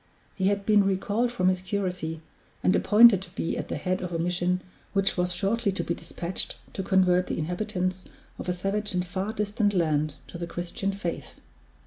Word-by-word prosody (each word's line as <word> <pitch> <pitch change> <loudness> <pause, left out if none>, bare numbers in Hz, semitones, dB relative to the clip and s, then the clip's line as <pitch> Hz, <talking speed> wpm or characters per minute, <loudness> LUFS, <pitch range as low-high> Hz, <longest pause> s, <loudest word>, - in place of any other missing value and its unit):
He 190 -1 0
had 200 0 0
been 210 -1 +5
recalled 200 +5 0
from 210 -7 +1
his 185 -1 +2
curacy, 180 -5 -3 0.4
and 90 0 +4
appointed 205 - +7
to 190 - -10
be 165 - -1
at - - -4
the - - -3
head 185 0 -1
of 180 -1 -4
a 170 - -1
mission 180 +2 0 0.3
which 195 -1 +2
was 180 0 0
shortly 200 +4 0
to - - -2
be 170 - -1
dispatched 175 +1 -2 0.2
to - - -3
convert 185 -1 +3
the - - -2
inhabitants 185 +2 -2 0.3
of - - -4
a - - +2
savage 195 +3 -1
and 180 0 0
far 190 +3 -3
distant 205 -1 0
land 155 -3 +1
to 170 - -9
the 170 - -3
Christian 175 +3 -3
faith. 195 -4 -5
185 Hz, 190 wpm, -27 LUFS, 175-200 Hz, 0.4 s, appointed